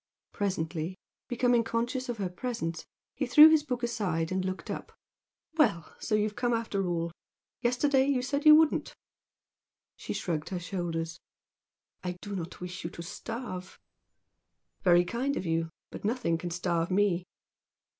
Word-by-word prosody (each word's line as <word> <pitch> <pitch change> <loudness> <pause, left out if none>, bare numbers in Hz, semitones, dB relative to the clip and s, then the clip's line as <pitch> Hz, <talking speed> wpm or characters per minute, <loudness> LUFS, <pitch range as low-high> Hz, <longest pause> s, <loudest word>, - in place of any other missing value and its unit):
Presently, 175 -3 -2 0.3
becoming 245 -1 +3
conscious 240 +3 -2
of 240 - -2
her 195 -3 -1
presence, 180 -4 -4 0.3
he 270 - -2
threw 300 +5 +10
his 315 -1 +5
book 250 -4 -4
aside 185 -9 -1
and 185 0 0
looked 185 0 -4
up. - - -7 0.6
"Well! 170 - +2
So 215 - 0
you've 210 0 0
come 245 -1 +1
after 200 -4 -1
all! 170 -1 -1 0.5
Yesterday 265 +2 +3
you 265 -3 +1
said 280 +3 -1
you 305 0 +10
wouldn't." 315 -1 +3 1.0
She - - -5
shrugged 160 -4 -2
her 185 - -2
shoulders. 170 -2 -3 0.8
"I 180 -1 -3
do 205 +1 -6
not 175 -1 -5
wish 180 0 -6
you 165 - -3
to 170 - -8
starve." 190 -1 -6 1.0
"Very 175 -2 +5
kind 255 +8 -1
of - - -3
you! 165 0 0 0.2
But - - -8
nothing 215 -7 0
can 175 - -4
starve 170 -1 0
me." 185 -2 +2
195 Hz, 150 wpm, -30 LUFS, 175-245 Hz, 1.0 s, threw